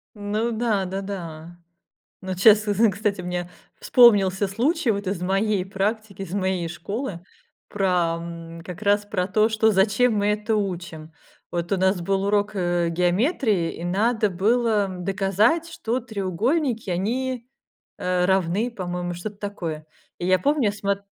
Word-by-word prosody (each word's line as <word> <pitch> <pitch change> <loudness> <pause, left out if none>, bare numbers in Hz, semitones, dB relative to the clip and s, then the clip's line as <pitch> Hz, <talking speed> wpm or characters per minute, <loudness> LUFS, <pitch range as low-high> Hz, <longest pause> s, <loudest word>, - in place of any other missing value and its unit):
Ну 210 +3 -2
да, 220 -4 0
да-да. 175 -4 -6 0.6
Но 185 -1 -4
час, 210 +3 +6
с, 205 -1 0
з 220 +2 +4
Кстати, 200 0 -2
мне 180 0 -4 0.3
вспомнился 200 -5 +5
случай 255 - +1
вот 200 -1 -2
из 190 -1 -2
моей 195 +1 +1
практики, 200 +1 -3
из 185 -3 -7
моей 185 -3 -1
школы 195 +3 -5 0.5
про, 180 -4 +1
м, 165 0 -8
как 180 +3 -8
раз 205 0 +2
про 200 -3 -1
то, 215 +3 +3
что 220 0 +3
"зачем 210 +4 +3
мы 205 0 +1
это 210 +1 0
учим". 175 -5 -4 0.4
Вот 175 +2 -2
у - - +3
нас 190 0 +2
был 195 +2 0
урок, 205 +1 +1
э, 175 -2 0
геометрии, 180 - +1
и 170 - -7
надо 210 +4 +1
было 210 +2 +2
доказать, 195 - +1
что 240 -2 -2
треугольники 225 - -1
они, 240 +7 -2 0.5
э, 180 0 0
равны, 190 +5 +1
по-моему, 180 -4 -4
что-то 200 +4 -6
такое. 170 -7 -5 0.3
И 175 - -3
я 185 0 +4
помню, 285 +2 +1
я 205 - +2
смот 200 -1 -2
195 Hz, 150 wpm, -24 LUFS, 180-215 Hz, 0.6 s, час